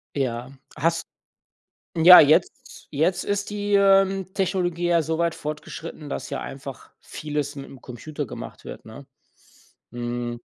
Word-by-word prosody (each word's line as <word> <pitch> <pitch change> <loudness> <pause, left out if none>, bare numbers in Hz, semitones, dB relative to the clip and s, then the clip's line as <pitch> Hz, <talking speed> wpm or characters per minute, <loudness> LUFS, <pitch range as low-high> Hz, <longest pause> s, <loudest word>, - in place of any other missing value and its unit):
Ja. 125 -3 -2 0.3
Hast 165 +1 0 0.9
ja, 170 +2 +10
jetzt, 155 +4 +2
jetzt 160 +5 +1
ist 205 0 -2
die, 205 0 -3
ähm, 195 -1 +4
Technologie 180 -3 0
ja 170 -1 +4
so 160 +1 -2
weit 170 0 +1
fortgeschritten, 150 0 -7
dass - - -5
ja - - -4
einfach 135 -1 -9
vieles 150 -1 -4
mit 140 -1 -7
‘m 135 - -13
Computer 145 +5 -6
gemacht - - -9
wird, - - -9
ne? - - -11 0.9
Hm 120 0 -4
160 Hz, 135 wpm, -24 LUFS, 140-180 Hz, 0.9 s, ja